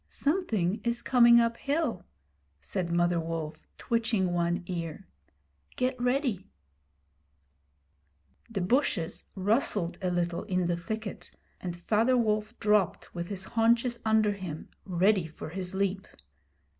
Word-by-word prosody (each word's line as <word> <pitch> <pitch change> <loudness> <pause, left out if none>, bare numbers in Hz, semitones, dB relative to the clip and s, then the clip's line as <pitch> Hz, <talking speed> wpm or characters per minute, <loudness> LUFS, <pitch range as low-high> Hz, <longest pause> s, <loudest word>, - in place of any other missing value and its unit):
'Something 220 - 0
is 235 0 0
coming 235 -2 +7
up 230 0 +2
hill,' 280 - -1 0.6
said 170 - -3
Mother 175 0 +2
Wolf, 160 -1 -4 0.2
twitching 225 -6 0
one 175 +1 0
ear. 170 +1 -5 0.7
'Get 255 +1 0
ready.' 245 - 0 2.0
The 210 -4 -2
bushes 185 - 0
rustled 205 -3 +1
a 185 - 0
little 175 -1 -1
in 180 -1 0
the 175 0 +1
thicket, 215 +4 -5 0.3
and 175 -2 -5
Father 225 +8 +2
Wolf 215 0 0
dropped 210 -4 +1
with 170 0 -4
his 195 -1 -4
haunches 235 +3 +2
under 220 -1 +3
him, 185 -6 -6 0.2
ready 185 0 +2
for 155 - -8
his 185 +2 -4
leap. 195 0 -1
195 Hz, 120 wpm, -29 LUFS, 175-230 Hz, 2.0 s, coming